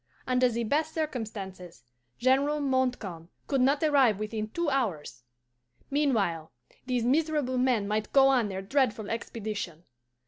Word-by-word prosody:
Under 255 0 +3
the 235 0 -2
best 310 +7 0
circumstances 210 - -5 0.3
General 275 +4 +2
Montcalm 250 - -1 0.2
could 275 -3 0
not 280 +4 +3
arrive 275 -9 +4
within 215 +1 -4
two 340 +8 -2
hours. 200 - -2 0.7
Meanwhile, 215 - 0 0.4
these 250 -2 0
miserable 290 -2 +1
men 245 -5 +2
might 215 +1 -2
go 270 -1 +6
on 245 -6 +2
their 190 0 -5
dreadful 220 -2 0
expedition. 210 -7 -5
245 Hz, 130 wpm, -28 LUFS, 210-275 Hz, 0.7 s, go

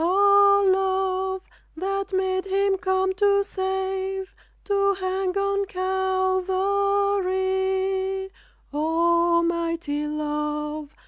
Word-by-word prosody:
O, 400 +2 +5
Love! 380 0 0 0.3
that 390 +2 -3
made 375 0 0
Him 390 0 +1
come 375 +1 0
to 400 +1 +3
save, 380 0 -3 0.3
To 400 -1 +2
hang 375 0 -2
on 395 0 0
Calvary, 380 0 0 0.4
O 340 +2 +2
mighty 335 -3 -2
Love! 300 0 -4
380 Hz, 80 wpm, -24 LUFS, 360-390 Hz, 0.4 s, O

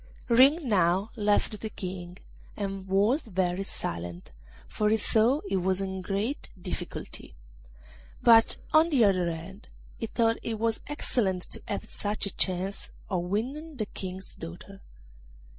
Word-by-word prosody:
Ring 270 +6 +6
now 190 0 +2
left 210 0 +1
the 220 - -3
King, 180 -3 -6 0.4
and 195 -2 -4
was 210 +9 +2
very 185 -2 0
silent, 85 - -5 0.4
for 210 -1 +1
he 220 - +4
saw 230 +7 +3
he 195 - -1
was 190 0 +1
in 190 -1 -3
a - - -5
great 205 +9 -2
difficulty: - - -6 0.8
but, 225 -1 +6 0.2
on 315 +2 +6
the 270 -7 +4
other 185 -3 +3
hand, 175 +6 -8 0.3
he 225 - -3
thought 230 0 +2
it 225 -1 -3
was 225 0 0
excellent 200 -10 -1
to - - -6
have - - -3
such 205 0 -2
a 200 - -3
chance 185 +1 0 0.2
of 175 -2 0
winning 270 - -3
the 215 - -1
King's 190 -1 -6
daughter. 175 +4 -9
200 Hz, 145 wpm, -28 LUFS, 185-225 Hz, 0.8 s, Ring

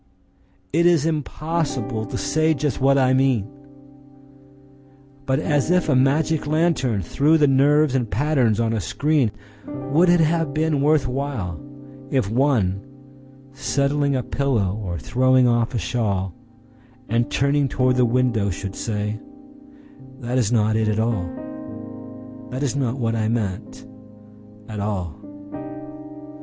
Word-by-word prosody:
—It 170 +2 +4
is 165 -4 +3
impossible 155 -6 -2
to - - -4
say 155 +1 +1
just 145 -1 -2
what 135 +1 +4
I 130 -1 +3
mean! 130 -6 +2 1.8
But 130 0 +2
as 145 -1 0
if 180 0 +2
a 140 - +3
magic 145 +4 +2
lantern 145 - +1
threw 145 - +2
the 150 -2 +4
nerves 145 +1 +3
in 125 -3 0
patterns 120 0 +1
on 115 -1 +1
a 110 - 0
screen:Would 135 - -1
it 175 0 +5
have 160 -2 +1
been 155 -2 +1
worth 150 -1 +3
whileIf 135 0 -4
one, 115 -7 +1 0.7
settling 140 +1 0
a 130 - -1
pillow 115 -6 -1
or 90 -3 -4
throwing 130 - +3
off 120 0 +1
a - - +1
shawl, 95 -2 -1 0.7
And 120 +1 0
turning 140 0 +1
toward 130 0 +1
the 125 - +4
window, 120 -4 +1
should 95 +1 -5
say:"That 135 - -6
is 115 -3 +1
not 110 -2 +2
it 110 0 +1
at 105 0 0
all, 110 -6 -1 1.2
That 130 +3 -4
is 140 -1 -1
not 130 -2 -1
what 115 -3 -1
I 110 -1 0
meant, 110 -5 -3 0.8
at 110 -2 -6
all." 100 -5 -3
130 Hz, 130 wpm, -22 LUFS, 110-145 Hz, 1.8 s, it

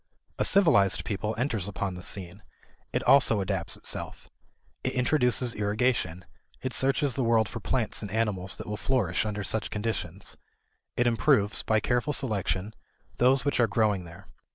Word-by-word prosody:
A - - +2
civilized 160 - +4
people 105 +1 -3
enters 115 -6 -1
upon 100 -1 -3
the 90 - -8
scene. 95 +1 -4 0.5
It - - -1
also 135 -6 +5
adapts 95 - -2
itself. - - -6 0.5
It - - -1
introduces 125 -2 +2
irrigation; 105 -4 -1 0.3
it 130 -1 -4
searches 135 +1 +2
the 130 - -1
world 115 -2 +3
for 115 - -7
plants 110 +4 -1
and 105 - -5
animals 100 -3 -1
that - - -8
will 105 0 -4
flourish 110 -5 0
under 105 -1 -3
such 110 +2 -1
conditions; 105 -4 -4 0.6
it 120 - +2
improves, 115 -3 +2
by 110 0 +1
careful 125 +6 0
selection, 105 -5 0 0.4
those 130 +3 +3
which 145 - 0
are 120 - +4
growing 105 -3 +1
there. 85 +3 -13
110 Hz, 155 wpm, -27 LUFS, 100-125 Hz, 0.6 s, also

